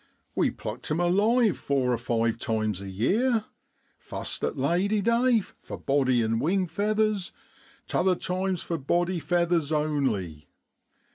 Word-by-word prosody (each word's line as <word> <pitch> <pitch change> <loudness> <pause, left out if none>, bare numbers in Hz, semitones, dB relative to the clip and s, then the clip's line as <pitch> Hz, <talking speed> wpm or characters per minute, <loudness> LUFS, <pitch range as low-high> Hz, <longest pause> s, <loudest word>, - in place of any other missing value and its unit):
We - - +2
plucked - - -6
'em 155 - 0
alive 205 +5 +3
four 130 -3 +1
or - - +1
five 115 -1 0
times 110 -4 -1
a 100 - -7
year, 215 - +1 0.5
fust - - -5
at - - -1
Lady 180 +10 +1
day, 235 +2 +3 0.2
for - - -7
body 130 -4 +2
an' 115 0 0
wing 185 +8 +1
feathers, 210 +2 0 0.5
t'other 185 0 +2
times 185 0 -2
for 165 -2 -3
body 175 +6 0
feathers 170 -3 +1
only. 130 - -1
170 Hz, 135 wpm, -27 LUFS, 125-195 Hz, 0.5 s, alive